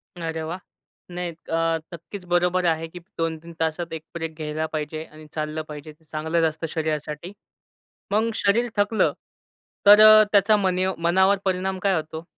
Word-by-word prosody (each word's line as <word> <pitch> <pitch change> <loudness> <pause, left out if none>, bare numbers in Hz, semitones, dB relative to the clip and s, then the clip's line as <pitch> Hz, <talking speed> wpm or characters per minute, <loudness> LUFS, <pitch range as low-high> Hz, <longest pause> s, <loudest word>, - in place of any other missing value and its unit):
अरे 165 -2 -4
वाह! 170 +4 -5 0.5
नाही 180 0 -3
अ, 165 0 -1 0.2
नक्कीच 180 +4 -9
बरोबर 175 +1 +1
आहे, 165 -1 +1
की 175 +2 -10 0.2
2-3 165 0 -3
तासात 165 +1 -2
1 160 -1 -5
ब्रेक 165 -2 -5
घ्यायला 155 0 -3
पाहिजे 155 +1 -3
आणि 155 0 -14
चाललं 155 0 -3
पाहिजे 150 0 -8
ते 160 - -31
चांगलंच 160 +2 0
असतं 155 +1 -6
शरीरासाठी. 155 +1 -3 0.8
मग 220 +2 +2
शरीर 230 +4 +2
थकलं, 210 +2 +2 0.7
तर 215 +1 +9
त्याचा 205 +1 +5
मनीव 185 -1 +1
मनावर 190 +3 +4
परिणाम 190 0 -1
काय 195 0 +2
होतो? 160 +1 -5
165 Hz, 150 wpm, -24 LUFS, 160-190 Hz, 0.8 s, तर